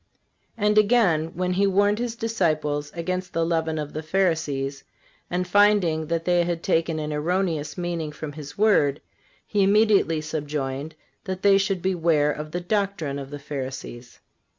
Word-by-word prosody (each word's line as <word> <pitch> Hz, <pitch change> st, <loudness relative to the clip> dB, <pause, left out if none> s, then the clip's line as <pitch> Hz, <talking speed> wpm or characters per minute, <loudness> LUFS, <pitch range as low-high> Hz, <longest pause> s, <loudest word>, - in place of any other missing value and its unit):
(370) 210 Hz, -2 st, 0 dB
And 210 Hz, 0 st, +2 dB
again, 205 Hz, -8 st, +3 dB
when 180 Hz, +1 st, -1 dB
he 200 Hz, +2 st, +2 dB
warned 205 Hz, +2 st, +2 dB
His 240 Hz, -1 st, -2 dB
disciples 155 Hz, -10 st, -1 dB
against 185 Hz, +2 st, -3 dB
the 165 Hz, 0 st, +1 dB
leaven 160 Hz, -1 st, 0 dB
of 150 Hz, -1 st, -5 dB
the 155 Hz, -, -3 dB
Pharisees, 155 Hz, -6 st, -1 dB, 0.5 s
and 180 Hz, +1 st, -1 dB
finding 185 Hz, -5 st, +3 dB
that 165 Hz, 0 st, -2 dB
they 175 Hz, -1 st, +3 dB
had 170 Hz, -1 st, -3 dB
taken 165 Hz, -3 st, +1 dB
an 150 Hz, -1 st, -3 dB
erroneous 160 Hz, -1 st, -1 dB
meaning 170 Hz, -3 st, -3 dB
from 150 Hz, 0 st, -7 dB
His 145 Hz, -1 st, -10 dB
word, 175 Hz, -10 st, +3 dB, 0.5 s
He 205 Hz, -, 0 dB
immediately 200 Hz, -5 st, +4 dB
subjoined 150 Hz, -1 st, -4 dB, 0.3 s
that 185 Hz, 0 st, -5 dB
they 200 Hz, -1 st, +6 dB
should 195 Hz, -2 st, -1 dB
beware 165 Hz, -5 st, +2 dB
of 150 Hz, +1 st, -6 dB
the 175 Hz, +3 st, -4 dB
doctrine 180 Hz, -7 st, -1 dB
of 135 Hz, -1 st, -7 dB
the 145 Hz, -, -6 dB
Pharisees. 135 Hz, -4 st, -7 dB
165 Hz, 160 wpm, -24 LUFS, 150-195 Hz, 0.5 s, they